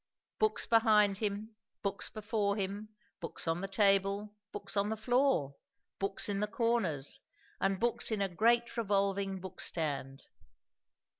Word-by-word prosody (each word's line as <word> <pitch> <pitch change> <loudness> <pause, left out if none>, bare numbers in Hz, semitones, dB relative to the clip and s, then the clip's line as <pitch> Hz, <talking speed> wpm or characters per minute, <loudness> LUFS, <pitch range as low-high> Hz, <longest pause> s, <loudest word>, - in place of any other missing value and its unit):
Books 435 0 +2
behind 215 -3 +4
him, 215 +1 -3 0.3
books 200 0 -1
before 210 -1 -1
him, 200 +1 -3 0.3
books 165 -1 -3
on 165 +2 0
the 195 - -3
table, 195 +1 +2 0.2
books 200 -1 -3
on 200 +1 +1
the 220 - -2
floor, 245 - +2 0.4
books 195 0 +1
in 200 -1 -1
the 210 - 0
corners, 210 - 0 0.4
and 195 -1 +1
books 240 +2 0
in 220 -2 -1
a 200 - +2
great 235 +6 +2
revolving 200 -2 0
bookstand. 150 -7 -3
200 Hz, 135 wpm, -33 LUFS, 195-220 Hz, 0.4 s, behind